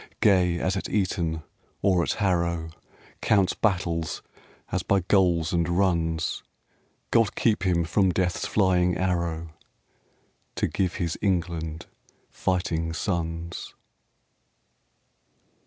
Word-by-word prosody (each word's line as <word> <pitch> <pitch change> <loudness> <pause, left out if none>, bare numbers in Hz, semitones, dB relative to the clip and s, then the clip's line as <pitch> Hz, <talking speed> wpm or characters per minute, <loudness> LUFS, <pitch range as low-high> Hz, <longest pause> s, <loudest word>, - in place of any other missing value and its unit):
Gay 90 -4 +4
as 95 +2 0
at 95 - -3
Eton 85 -6 -1 0.4
or 95 -3 +4
at - - 0
Harrow, 85 -5 0 0.5
Counts 100 -3 +3
battles 85 -6 -1 0.5
as - - 0
by 100 -1 +2
goals 90 -3 +2
and 85 -1 +1
runs: 85 -3 0 0.7
God 115 -3 +3
keep 110 -3 +2
him 90 -3 +2
from 95 +4 +2
Death's 90 -1 0
flying 90 -3 +2
arrow 85 -3 -1 1.1
To - - 0
give 95 -2 -1
his 85 -2 -2
England 85 -4 -1 0.5
fighting 85 -3 -1
sons. 85 -1 -3
85 Hz, 105 wpm, -26 LUFS, 85-95 Hz, 1.1 s, Gay